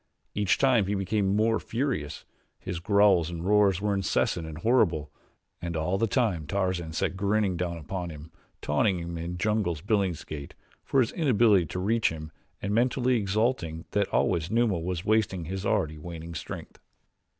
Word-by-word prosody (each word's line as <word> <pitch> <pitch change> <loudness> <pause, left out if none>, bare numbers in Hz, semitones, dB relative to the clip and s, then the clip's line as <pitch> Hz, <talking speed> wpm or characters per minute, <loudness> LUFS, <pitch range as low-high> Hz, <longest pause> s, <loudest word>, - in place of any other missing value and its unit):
Each 105 -3 +2
time 125 -7 +3
he 100 - 0
became 95 0 0
more 110 +1 +2
furious. 115 - -3 0.3
His 90 -2 -5
growls 100 -3 +4
and 85 0 -5
roars 100 -2 +4
were 105 -1 +1
incessant 95 -4 0
and 80 -1 -7
horrible 85 -8 +2 0.5
and 85 -1 -3
all 90 +5 0
the 115 - +2
time 100 - 0
Tarzan 90 -3 -1
sat 80 - -1
grinning 100 -1 +1
down 85 -1 -2
upon 85 +3 -5
him, 75 +1 -10 0.3
taunting 90 +6 +2
him 85 0 -5
in 85 +1 -4
jungle 105 -2 0
billingsgate 85 -5 -2 0.3
for 135 - +2
his 115 - 0
inability 115 - +3
to 90 - -4
reach 110 +4 +2
him 80 -1 -7 0.3
and 100 +2 -1
mentally 125 +2 +2
exulting 100 -6 -1
that 100 -1 +1
always 85 -2 +1
Numa 115 -5 +2
was 85 0 -3
wasting 105 -5 +1
his 95 +4 -3
already 80 -8 0
waning 85 +1 -7
strength. 75 - -7
95 Hz, 160 wpm, -27 LUFS, 85-105 Hz, 0.5 s, growls